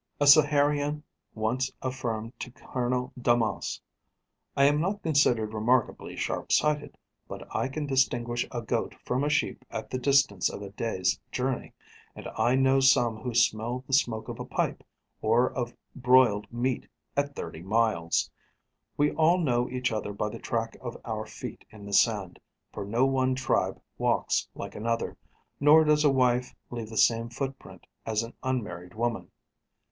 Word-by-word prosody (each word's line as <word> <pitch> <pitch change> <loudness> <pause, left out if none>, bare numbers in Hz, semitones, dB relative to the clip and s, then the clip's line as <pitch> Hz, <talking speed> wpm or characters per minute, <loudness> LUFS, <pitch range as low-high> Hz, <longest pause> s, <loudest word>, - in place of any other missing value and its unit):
A 145 - +3
Saharian 145 0 +4 0.3
once 120 +4 -1
affirmed 120 -3 -3
to - - -5
Colonel 125 +1 -3
Daumas: 120 -3 +1 0.8
'I 140 - +5
am 145 +1 +3
not 200 +4 -2
considered 125 -9 +2
remarkably 115 +3 0
sharp - - -3
sighted, 150 -1 +1 0.3
but - - -8
I - - +1
can 145 +3 -4
distinguish 120 -3 +1
a - - -4
goat - - -2
from 130 +3 0
a 145 - +1
sheep - - 0
at - - -6
the 130 - -2
distance 135 -7 +3
of 100 - -7
a 100 - -8
day's 95 -4 -1
journey; 130 0 -2 0.4
and - - -8
I 120 +2 +2
know 135 0 +4
some 125 -4 +4
who 120 +1 -5
smell 120 +1 +1
the 135 - -7
smoke 115 -5 +1
of - - -6
a - - -3
pipe, - - -2 0.4
or 115 +3 +3
of 120 -2 -3 0.2
broiled 125 -5 +4
meat, 120 +1 -1 0.3
at 140 0 -1
thirty 80 - -6
miles! 95 -4 +1 0.7
We 145 0 +3
all 165 +3 +3
know 125 -8 +1
each 125 0 -1
other 105 -2 -3
by 105 +1 -2
the - - -8
track 115 -1 -2
of 120 -2 -6
our 110 -1 -4
feet 105 - -8
in 105 -2 -12
the 100 - -7
sand, 100 -3 +2 0.3
for 100 - -5
no 115 +6 +2
one 130 -1 +1
tribe 130 -1 0 0.2
walks - - +1
like - - -7
another, 115 +2 -2 0.4
nor 150 +2 +7
does 150 0 +3
a 150 - +5
wife 125 -2 +2 0.2
leave 115 -3 -5
the 110 - -7
same 115 0 +3
footprint 135 +2 -6 0.2
as 110 0 -1
an 115 - -8
unmarried 105 -9 -4
woman. 115 0 -2
125 Hz, 160 wpm, -28 LUFS, 110-135 Hz, 0.8 s, nor